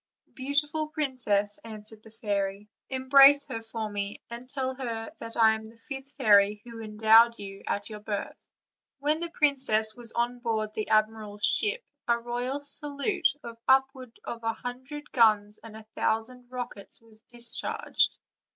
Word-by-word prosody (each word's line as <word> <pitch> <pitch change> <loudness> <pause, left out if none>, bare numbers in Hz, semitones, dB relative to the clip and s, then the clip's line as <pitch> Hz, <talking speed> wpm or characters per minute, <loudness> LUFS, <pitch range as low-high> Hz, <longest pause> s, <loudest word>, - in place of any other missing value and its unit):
"Beautiful 290 +3 -1
princess," 245 -9 0
answered 215 -1 -5
the 220 - -15
fairy, 205 -2 -3 0.2
"embrace 275 +2 +7
her 225 - -5
for 225 -1 -5
me, 205 -1 -4
and 240 +2 -8
tell 260 -1 -2
her 235 0 -5
that 230 0 -4
I 220 -1 +6
am 220 0 -5
the 225 +1 -13
fifth 270 +2 -8
fairy 210 -5 +4
who 230 -1 -9
endowed 220 +2 +5
you 195 -1 -8
at 205 - -2
your 215 -1 -7
birth." 205 -1 -5 0.5
When 295 +3 +1
the 340 0 -3
princess 260 -9 +2
was 235 -2 -8
on 240 +1 -1
board 220 -3 -2
the 215 - -4
admiral's 215 -1 +1
ship 470 +4 +1 0.2
a 235 0 +3
royal 245 +4 -3
salute, 295 +5 0 0.2
of 230 -1 -9
upward 265 -2 +2
of 235 - -5
a 225 0 0
hundred 260 +6 -7
guns 210 -3 +3
and 220 -1 -10
a 220 - -12
thou 220 0 +1
sand 250 +1 -13
rockets, 245 -5 -7
was 220 -1 -21
discharged. 240 -1 0
230 Hz, 160 wpm, -28 LUFS, 215-265 Hz, 0.5 s, embrace